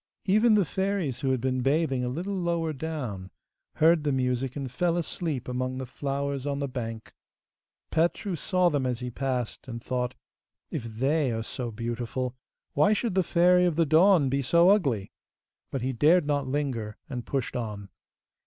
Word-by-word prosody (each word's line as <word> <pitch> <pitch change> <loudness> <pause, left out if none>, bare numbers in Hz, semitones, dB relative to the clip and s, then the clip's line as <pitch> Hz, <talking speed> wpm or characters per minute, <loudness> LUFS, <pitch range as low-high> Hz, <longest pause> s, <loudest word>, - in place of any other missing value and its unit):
Even 215 +3 +4
the 200 -3 +3
fairies 190 -9 -1
who 135 -1 -1
had 130 -1 +1
been 130 +1 0
bathing 135 -1 +1
a 125 - -1
little 175 +10 -3
lower 170 -3 -1
down 130 -11 -5 0.5
heard 160 0 +4
the 145 - +1
music 130 -1 -1
and 135 -4 -4
fell 170 +6 +1
asleep 160 -5 -3
among 130 +1 -2
the 130 - -4
flowers 140 +1 -3
on 140 -1 -1
the 140 0 -2
bank. 115 -4 -6 0.8
Petru 175 +3 +1
saw 180 +2 +2
them 140 -5 0
as 125 -2 -2
he 125 0 -4
passed, 125 -2 -3
and 115 -2 -5
thought, 125 -1 -2 0.6
'If 115 - -3
they 135 +5 0
are 115 0 -2
so 120 +2 -4
beautiful, 120 +3 -3 0.4
why 150 +9 +4
should 220 0 -1
the 190 - +3
Fairy 180 +1 +4
of 175 -3 +1
the 165 +1 +3
Dawn 160 0 +5
be 135 +2 0
so 170 +7 +5
ugly?' 135 - +1 0.6
But 135 -3 -3
he 130 +1 -1
dared 155 +7 +4
not 145 -2 0
linger, 130 -7 -2
and 125 -3 -5
pushed 135 -1 -3
on. 105 -4 -4
135 Hz, 175 wpm, -27 LUFS, 125-165 Hz, 0.8 s, Dawn